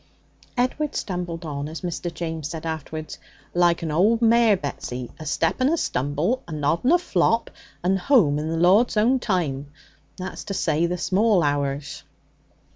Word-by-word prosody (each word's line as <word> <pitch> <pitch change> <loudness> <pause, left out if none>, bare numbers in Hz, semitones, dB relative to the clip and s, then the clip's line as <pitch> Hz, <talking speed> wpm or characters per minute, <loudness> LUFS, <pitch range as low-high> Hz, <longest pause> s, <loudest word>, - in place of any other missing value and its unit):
Edward 275 +4 0
stumbled 175 -3 -4
on, 145 -1 -4
as 160 - -7
Mr. 175 -1 -4
James 160 -3 -4
said 160 -1 -6
afterwards, 155 0 -5 0.3
'like 175 -1 +3
my 160 -2 -2
old 210 +8 +3
mare 230 -2 +5
Betsy, 125 -5 -5
a 155 - -7
step 165 - 0
and 260 - +4
a 335 - +1
stumble, 150 - -1
a - - -9
nod 150 +2 0
and 265 +7 +4
a - - +7
flop, 230 - +1 0.3
and 190 +2 +2
home 180 - +3
in 155 +1 -3
the 165 - -1
Lord's 195 +7 +4
own 245 +5 +3
time 155 - -1 0.5
that's 185 +1 -6
to 195 - -4
say, 160 -1 +1
the 180 +1 -2
small 195 +1 +2
hours.' 140 -1 -2
170 Hz, 170 wpm, -24 LUFS, 155-210 Hz, 0.5 s, a